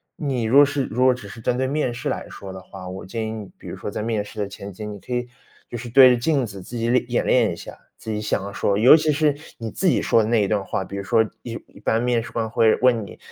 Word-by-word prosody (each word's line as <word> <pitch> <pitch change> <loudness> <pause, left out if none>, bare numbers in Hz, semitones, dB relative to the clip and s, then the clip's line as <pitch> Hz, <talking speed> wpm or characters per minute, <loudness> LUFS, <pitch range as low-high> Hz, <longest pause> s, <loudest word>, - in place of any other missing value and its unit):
你 135 -6 -2
如 115 +5 +3
果 145 - +9
是 140 -1 -1
如 125 +3 -1
果 130 0 +6
只 115 -5 -9
是 110 +3 -10
针 120 +2 0
对 130 +1 0
面 140 -3 -1
试 - - -4
来 - - -4
说 95 -1 -9
的 95 - -8
话， 95 -1 -10
我 95 +1 -7
建 110 +3 -4
议 110 - -4
你， 110 -3 -7
比 - - -13
如 - - -6
说 - - -6
在 105 - -4
面 110 -2 -1
试 105 +1 -10
的 100 - -1
前 100 0 -9
期， 105 +4 -7
你 105 -1 -7
可 125 - -7
以 125 0 -1 0.4
就 120 - -5
是 120 +1 -7
对 130 +2 +8
着 125 - +3
镜 140 -1 +1
子 100 -4 -9
自 120 +6 -8
己 115 0 -1
练 125 +1 +2
演 - - +1
练 - - +3
一 - - -4
下， - - -10 0.2
自 110 - -6
己 105 - -2
想 105 -1 -1
要 100 - -7
说 100 0 0
尤 120 +7 +8
其 155 -1 +2
是 150 0 +2 0.2
你 115 -1 -5
自 190 - -1
己 - - +3
说 115 - +4
的 105 - -2
那 115 -2 +3
一 - - 0
段 105 -1 0
话。 95 - -2
比 95 - -8
如 100 - -4
说 110 +3 +3 0.2
一 120 - -7
一 - - -17
般 115 - +1
面 120 -1 +1
试 - - -10
官 115 -1 -2
会 110 0 +4
问 120 -3 +3
你， - - -12
115 Hz, 335 characters per minute, -22 LUFS, 105-125 Hz, 0.4 s, 果